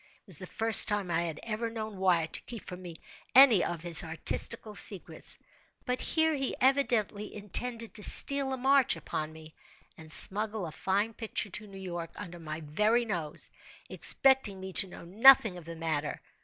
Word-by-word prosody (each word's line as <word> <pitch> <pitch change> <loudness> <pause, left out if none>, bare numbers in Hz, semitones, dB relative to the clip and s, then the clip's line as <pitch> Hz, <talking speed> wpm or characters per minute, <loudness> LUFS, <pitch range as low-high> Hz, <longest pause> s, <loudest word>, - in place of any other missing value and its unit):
It - - -32
was - - -2
the - - -10
first 225 -1 +6
time 205 -4 -3
I 165 0 -1
had 165 -3 -6
ever 230 +1 -5
known 220 -2 -8
Wyatt 175 -4 0
to - - -1
keep 235 -4 -10
from 180 0 -10
me 175 -2 -10 0.4
any 250 -8 +6
of 170 -2 -5
his 170 -2 +5
artistical 210 +7 -2
secrets; 200 -2 -2 0.5
but 250 0 -3
here 320 0 0
he 270 -3 -3
evidently 240 -6 -1
intended 225 +3 -4
to 210 - -4
steal 275 +3 +4
a 265 - -4
march 270 0 +1
upon 155 0 -7
me, 160 0 -15 0.4
and 160 -1 -13
smuggle 210 +2 +5
a 160 - -8
fine 200 +7 -3
picture 215 -3 -5
to 210 +3 -9
New 195 -1 -13
York, 175 -3 -7
under 175 0 -10
my 155 -1 -8
very 210 +11 -1
nose; 165 -8 -4 0.4
expecting 265 -8 +3
me 190 0 -9
to 195 - +2
know 175 - -13
nothing 225 +2 +4
of 175 -3 -12
the 165 0 -10
matter. 160 -2 -5
205 Hz, 185 wpm, -28 LUFS, 170-230 Hz, 0.5 s, first